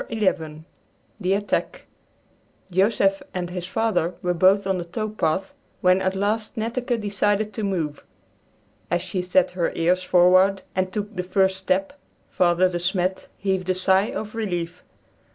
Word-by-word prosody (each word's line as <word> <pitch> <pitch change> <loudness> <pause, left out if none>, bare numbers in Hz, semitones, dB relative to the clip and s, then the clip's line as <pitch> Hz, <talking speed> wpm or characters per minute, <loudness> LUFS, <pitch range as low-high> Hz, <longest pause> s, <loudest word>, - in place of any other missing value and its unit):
XI 165 -8 -1 0.6
THE 185 +1 +1
ATTACK 205 0 -2 0.9
Joseph 195 +1 +2
and 180 -1 -3
his 180 -1 -4
father 195 -5 0
were 180 0 +1
both 190 +3 +4
on 190 -1 0
the - - -3
tow 215 +6 -4
path 190 -2 -1 0.3
when 185 +1 +4
at 190 0 0
last 210 +3 -1
Netteke 240 +2 -1
decided 205 +1 0
to 220 - -4
move. 165 -7 -2 0.9
As 175 0 0
she 185 - -3
set 180 0 +2
her 180 -2 -1
ears 180 +2 +2
forward 185 +2 +4
and 185 0 -1
took 210 +2 -4
the 180 - -1
first 190 +1 +1
step, 190 +4 0 0.4
Father 175 +1 +3
De 175 -1 -3
Smet 185 +1 -1
heaved 190 -2 -1
a 185 - +2
sigh 190 +3 +3
of 215 -1 -5
relief. 180 -6 -3
190 Hz, 150 wpm, -23 LUFS, 180-205 Hz, 0.9 s, both